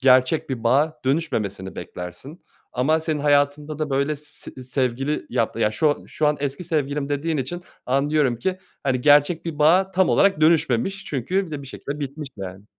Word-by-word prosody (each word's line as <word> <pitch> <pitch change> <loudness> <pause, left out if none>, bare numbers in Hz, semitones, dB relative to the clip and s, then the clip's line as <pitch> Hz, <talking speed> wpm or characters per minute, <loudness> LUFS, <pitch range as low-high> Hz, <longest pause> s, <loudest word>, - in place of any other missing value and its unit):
gerçek 130 +3 +4
bir 120 -3 -4
bağa 145 +6 +2
dönüşmemesini 105 - -1
beklersin. 90 - -8 0.3
Ama 155 +6 +2
senin 155 -2 -2
hayatında 145 +1 +1
da, 150 -2 -1
böyle, 140 +2 +1
s 145 -3 -12
sevgili 130 +3 -1
yap 115 - 0
ya, 105 - +3
şu 145 +5 +1
şu 155 - 0
an 150 - +1
eski 140 +5 -3
sevgilim 145 -2 -1
dediğin 155 +3 -1
için 175 +7 -4 0.2
anlıyorum 140 -1 +2
ki, 185 +9 -1 0.2
hani, 130 -3 0
gerçek 150 +5 +4
bir 160 -3 -5
bağa 180 +6 +4
tam 190 0 +2
olarak 195 -6 +3
dönüşmemiş 160 +4 +2
çünkü 180 +9 -1
bir - - -12
de 145 -2 -5
bir - - -10
şekilde 140 +3 -6
bitmiş, 140 +1 -5
yani. 95 0 -7
145 Hz, 175 wpm, -23 LUFS, 130-155 Hz, 0.3 s, gerçek